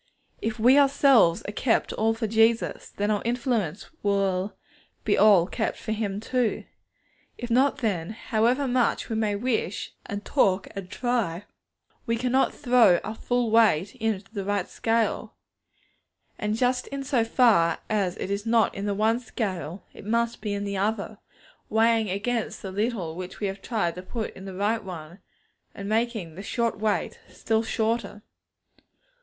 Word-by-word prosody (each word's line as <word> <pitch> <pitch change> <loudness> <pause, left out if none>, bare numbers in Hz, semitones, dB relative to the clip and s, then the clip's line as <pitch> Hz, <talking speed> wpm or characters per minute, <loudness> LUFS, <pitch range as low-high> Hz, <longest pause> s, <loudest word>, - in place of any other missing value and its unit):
If 220 0 -2
we 250 +5 +6
ourselves 270 -10 +4
are - - -3
kept 225 +2 +1
all 225 +1 +1
for 225 0 -2
Jesus, 225 +1 +2
then 205 +1 -1
our 205 - 0
influence 230 - -1 0.2
will 195 -1 0 0.5
be - - +2
all 200 -5 +6
kept 220 +4 -2
for 220 - -5
Him 205 -2 -2
too. 245 0 -1 0.7
If 240 -1 -6
not, 265 +4 +3
then, 190 -9 -1
however 230 +5 0
much 250 -1 +1
we 225 - -2
may 215 -2 0
wish 220 -3 -2
and 205 +1 -5
talk 195 -8 +2
and 195 -2 -6
try, 205 -6 -1 0.6
we 230 - +1
cannot 255 +3 +2
throw 240 -9 +4
our 215 - -4
full 245 0 -1
weight 205 -6 +4
into 215 -3 -2
the 200 -3 -3
right 200 -1 -1
scale. 225 0 -1 1.0
And 210 0 -1
just 250 +1 +1
in 275 0 -5
so 255 -4 +1
far 225 -8 +4
as 195 -4 0
it 195 - -4
is 200 +1 -1
not 225 -1 +2
in 200 +1 -4
the 200 - 0
one 220 +3 +2
scale, 195 -7 -4
it - - -12
must 235 +2 0
be 210 -2 -2
in 200 - -3
the 200 -1 -3
other; 210 +1 -2 0.5
weighing 225 -1 +3
against 225 +4 -2
the 190 - -5
little 200 -5 -2
which 185 +1 -7
we 210 - -2
have 195 0 -4
tried 205 -8 -1
to 180 - -7
put 220 +4 -5
in 190 - -10
the 190 -1 -7
right 210 +3 0
one, 175 -1 -8 0.6
and 200 - -6
making 220 -6 -1
the 185 - -8
short 230 +1 -1
weight 215 -1 -1
still 220 -1 0
shorter. 220 -2 -2
220 Hz, 165 wpm, -26 LUFS, 195-235 Hz, 1.0 s, we